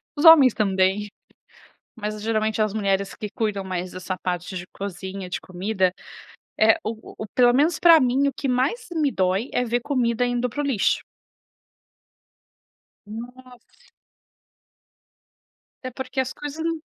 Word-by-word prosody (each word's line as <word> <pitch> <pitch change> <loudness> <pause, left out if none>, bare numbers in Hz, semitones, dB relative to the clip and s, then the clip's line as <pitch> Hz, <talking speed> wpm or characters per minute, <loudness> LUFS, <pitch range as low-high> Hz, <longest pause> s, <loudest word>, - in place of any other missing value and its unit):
os 290 - -1
homens 290 -7 +9
também, 195 0 +1 0.9
mas 215 -1 -4
geralmente 220 -1 0
as 215 -1 -1
mulheres 200 -2 0
que 215 -2 -6
cuidam 210 -4 -2
mais 185 -1 -4
dessa 185 0 -5
parte 180 +1 -4
de 180 0 -6
cozinha, 195 -1 -6
de 180 - -4
comida, 185 0 -1 0.7
é 220 +1 +6
o 220 - -1 0.2
o - - -17
o 215 - -5
pelo 245 -1 +5
menos 305 +5 +2
pra 335 -2 +7
mim, 260 +3 +2
o 275 - -2
que 275 - -4
mais 260 - 0
me 310 -4 +1
dói 190 +2 0
é 250 - +1
ver 240 +1 0
comida 245 -3 0
indo 245 0 -1
para 270 +5 -5
o - - -3
lixo. 240 -8 +1 2.1
Nossa. 245 +3 -12 1.9
É 255 - -4
porque 260 +1 -5
as 260 -1 0
coisas 295 +2 -6
não 330 -1 -2
225 Hz, 150 wpm, -23 LUFS, 195-260 Hz, 2.1 s, homens